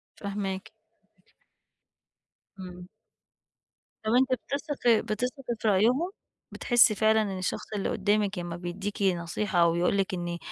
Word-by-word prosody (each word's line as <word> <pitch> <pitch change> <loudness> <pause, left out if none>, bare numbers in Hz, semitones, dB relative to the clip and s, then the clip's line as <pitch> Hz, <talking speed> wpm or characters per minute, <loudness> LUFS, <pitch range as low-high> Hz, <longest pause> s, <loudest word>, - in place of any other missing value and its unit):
فاهماكِ. 195 -1 -4 1.9
إمم. 180 -1 -9 1.2
طب 215 - -1
أنتِ 255 -2 +1
بتثقي 265 -6 +1
بتثقي 245 +3 -3
في 220 - -1
رأيهم، 240 - +3 0.4
بتحسي 240 -3 +4
فعلًا 220 +1 +3
إن 195 -3 -3
الشخص 185 +3 -4
اللي 200 - -1
قدامِك 205 -1 +1
لما 175 0 -5
بيدّيكِ 195 +4 -5
نصيحة، 180 +1 0
أو 170 0 +4
يقول 175 +3 +1
لِك 195 -1 0
إن 175 -1 -3
200 Hz, 120 wpm, -28 LUFS, 180-220 Hz, 1.9 s, بتحسي